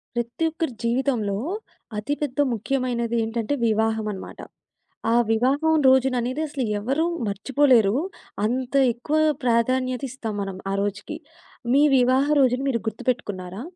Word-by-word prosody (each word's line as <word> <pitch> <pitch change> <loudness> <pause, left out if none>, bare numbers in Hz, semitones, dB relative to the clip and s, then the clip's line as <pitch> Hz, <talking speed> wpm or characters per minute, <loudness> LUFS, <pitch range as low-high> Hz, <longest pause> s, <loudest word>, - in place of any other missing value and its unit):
ప్రతి 240 +6 -2
ఒక్కరి 320 -5 -3
జీవితంలో 235 -4 0 0.6
అతి 235 +8 -2
పెద్ద 290 -1 -3
ముఖ్యమైనది 235 0 -1
ఏంటంటే 225 +3 -2
వివాహం 220 0 +1
అన్నమాట. 195 - -9 0.7
ఆ - - +4 0.2
వివాహం 275 +8 +2
రోజుననేది 260 +1 +2
అసలెవ్వరూ 260 +2 -1 0.2
మర్చిపోలేరు. 230 +1 +3 0.5
అంత 250 +3 -2 0.2
ఎక్కువ 290 +6 -2 0.3
ప్రాధాన్యత 255 +2 +1
ఇస్తాం 230 -4 -5
మనం 195 -1 -5
ఆ - - -1
రోజుకి. 205 +9 -4 0.6
మీ 280 +2 +5
వివాహ 260 +2 +3
రోజుని 255 -1 +3
మీరు 230 -4 -1
గుర్తుపెట్టుకున్నారా? 205 -5 -3
245 Hz, 115 wpm, -24 LUFS, 220-265 Hz, 0.7 s, మీ